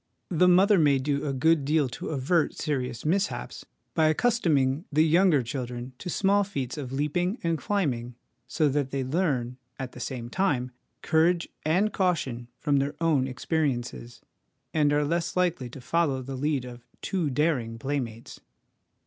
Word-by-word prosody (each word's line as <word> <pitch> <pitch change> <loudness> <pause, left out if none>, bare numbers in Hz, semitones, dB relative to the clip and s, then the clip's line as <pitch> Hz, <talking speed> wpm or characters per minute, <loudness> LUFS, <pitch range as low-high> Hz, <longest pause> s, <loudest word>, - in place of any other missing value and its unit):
The 180 +1 +4
mother 190 +2 +5
may 145 -3 +4
do 140 +2 -1
a - - 0
good 155 +3 +2
deal 150 0 +2
to 125 - -6
avert 155 +3 +1
serious 125 -5 -3
mishaps 195 +6 -1 0.3
by 160 -1 +3
accustoming 155 - +2
the 155 +2 +4
younger 165 -3 +4
children 125 0 -5
to - - -6
small 200 +3 +2
feats 135 -11 -4
of 140 -5 -6
leaping 165 - 0
and 165 -1 +1
climbing, 135 - -2 0.3
so 155 +4 +1
that 140 -1 0
they 135 0 -2
learn, 130 -5 -1 0.2
at 130 -2 -5
the - - -11
same 125 -2 -5
time, 130 -5 0 0.3
courage 170 +2 +2
and 185 +7 +2
caution 140 -11 -1
from 145 -2 +1
their 140 +2 -1
own 155 -6 +2
experiences, 125 - -2 0.5
and 150 -2 +3
are 145 0 +2
less 170 +4 -1
likely 175 -9 0
to 135 - -10
follow 135 0 0
the 135 +1 -6
lead 140 -1 -1
of 120 -1 -11 0.2
too 175 -6 -1
daring 130 -5 0
playmates. 120 -3 -4
145 Hz, 155 wpm, -27 LUFS, 130-170 Hz, 0.5 s, mother